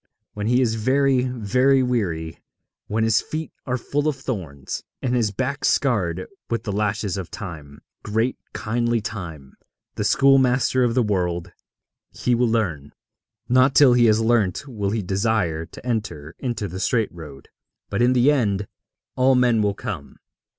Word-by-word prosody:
When 105 0 -3
he 125 +2 +3
is 115 -3 +1
very, 130 +3 +2
very 125 +3 +2
weary, 90 -10 -2 0.5
when 110 +2 0
his 110 -1 +3
feet 155 +1 -5 0.2
are 125 0 0
full 145 +5 -2
of 150 - +1
thorns, 95 - -5 0.2
and 125 -2 -1
his 120 -4 +2
back 130 +7 -3
scarred 95 -10 +1 0.2
with 115 - -1
the 105 - -3
lashes 105 -1 -1
of 95 -3 -5
Time 75 -7 -8 0.2
great, 110 +4 0 0.2
kindly 120 +1 0
Time, 85 -10 -7 0.4
the - - -3
schoolmaster 130 -2 +4
of 120 -1 +1
the 125 - +3
world 90 -5 -1 0.6
he 125 - -1
will 120 0 +2
learn. 85 -11 -1 0.5
Not 130 +2 +4
till 135 -4 +7
he 120 -1 +5
has 110 -1 +4
learnt 115 +1 +1
will 105 -6 -3
he 110 0 -1
desire 95 -4 0
to 110 - -13
enter 85 -11 -3
into 120 -5 -3
the 95 +1 -7
straight 110 -3 0
road. 75 -5 -11 0.4
But 100 - 0
in 125 +1 +4
the 130 +3 +4
end 105 -8 0 0.5
all 130 +1 +4
men 120 -3 +3
will 100 -1 +1
come. 100 - -6
110 Hz, 160 wpm, -23 LUFS, 95-125 Hz, 0.6 s, till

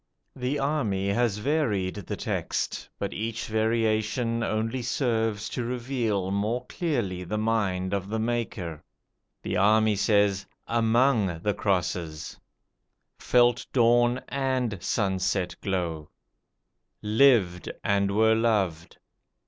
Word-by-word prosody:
The 130 +2 -2
army 115 -10 0
has 110 0 +1
varied 105 -7 0
the 100 -4 -5
text; - - -3
but 100 - -3
each 115 +1 -3
variation 110 +1 0
only 115 +3 -1
serves 115 -4 -1
to 125 - -3
reveal 115 -6 -2
more 110 +5 -1
clearly 115 - -2
the 105 +5 -3
mind 100 -4 0
of 100 0 -2
the 110 - -1
maker. 110 -8 -3 0.6
The 95 - -2
army 110 +2 +4
says, 100 -1 +2 0.2
"AMONG 115 -6 +2
the 105 - +1
crosses"; 90 -6 -2 0.8
"felt 120 -1 +3
dawn 120 0 +3
AND 130 -7 -1
sunset 95 -3 0
glow"; 85 -5 -2 0.9
"LIVED 105 -5 +3
and 100 -1 +2
were 110 +2 +4
loved". 100 -8 0
110 Hz, 110 wpm, -26 LUFS, 95-120 Hz, 0.9 s, army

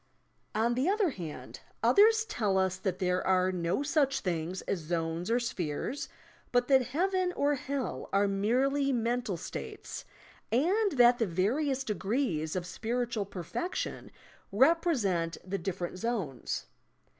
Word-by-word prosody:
On 230 +2 +2
the 260 +8 +1
other 405 -4 +2
hand, 170 - -8 0.2
others 440 +2 +5
tell 215 - 0
us 190 -1 +1
that 190 -1 -2
there 180 -1 0
are 185 0 +3
no 180 +8 -1
such 275 -2 +1
things 175 0 -2
as 195 - -2
zones 165 +2 -2
or 235 +2 +3
spheres, 215 - -3 0.4
but 245 0 +2
that 265 -3 +5
Heaven 365 +6 +1
or 290 -2 +2
Hell 275 -1 -3
are 200 +1 +3
merely 260 +8 +1
mental 240 -4 0
states, - - -7 0.5
and 375 - +2
that 245 -2 +6
the 225 - +2
various 260 - 0
de 220 - -1
grees 190 - -1
of 180 -2 -2
spiritual 230 +3 -2
perfection 200 - -4 0.4
represent 215 - +2
the 195 +1 -3
different 180 0 -4
zones. 195 - -2
230 Hz, 135 wpm, -30 LUFS, 185-275 Hz, 0.5 s, that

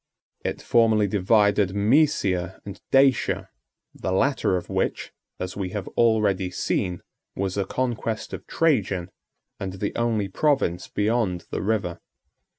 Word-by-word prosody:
81 - - 0
It - - -16
formerly 110 -3 +3
divided 100 0 +3
Mæsia 100 - +2
and 100 0 -8
Dacia, 135 -2 +3 0.4
the - - -4
latter 95 -2 +2
of 90 - -6
which, - - -2 0.3
as 90 0 -4
we 95 -2 -3
have 105 -3 -4
already 105 -5 +2
seen, 90 0 -2 0.3
was 95 -1 -2
a 100 -1 0
conquest 115 -1 -3
of - - -7
Trajan, 100 - +1 0.5
and 95 -1 -4
the 100 +2 -3
only 115 -4 0
province 115 - 0
beyond 105 -4 0
the - - -2
river. 100 -4 -1
100 Hz, 135 wpm, -24 LUFS, 95-115 Hz, 0.5 s, formerly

